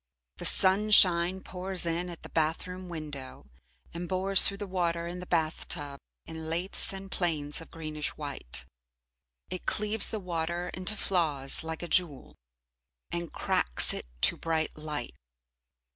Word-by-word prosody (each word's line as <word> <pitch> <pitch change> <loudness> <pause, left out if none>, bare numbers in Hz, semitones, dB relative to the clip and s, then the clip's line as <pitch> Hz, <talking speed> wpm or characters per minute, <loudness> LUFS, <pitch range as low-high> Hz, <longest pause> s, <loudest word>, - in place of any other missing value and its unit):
The - - -6
sunshine 190 -2 +6
pours 185 -1 -2
in 170 +2 -2
at 170 - -10
the - - -9
bath 160 0 -1
room 185 0 -9
window 150 -5 -8 0.5
and 170 +1 -6
bores 190 +1 +6
through 200 - -2
the 205 - -6
water 170 -3 -2
in 175 +1 -6
the 180 - -9
bath 160 -2 -1
tub 140 -1 -5 0.3
in 160 -1 -7
lathes 175 +4 -1
and 195 0 -8
planes 155 -4 -2
of 165 - -12
greenish 155 -2 -5
white. 140 - -6 0.9
It 185 - -6
cleaves 210 0 +2
the 220 - -5
water 175 -1 -4
into 185 +3 0
flaws 155 -10 0
like 160 +1 -6
a - - -5
jewel, 165 -6 -1 0.8
and 170 -1 -5
cracks - - +4
it - - -7
to - - +5
bright 160 -1 -2
light. 150 -5 -5
170 Hz, 150 wpm, -28 LUFS, 155-185 Hz, 0.9 s, sunshine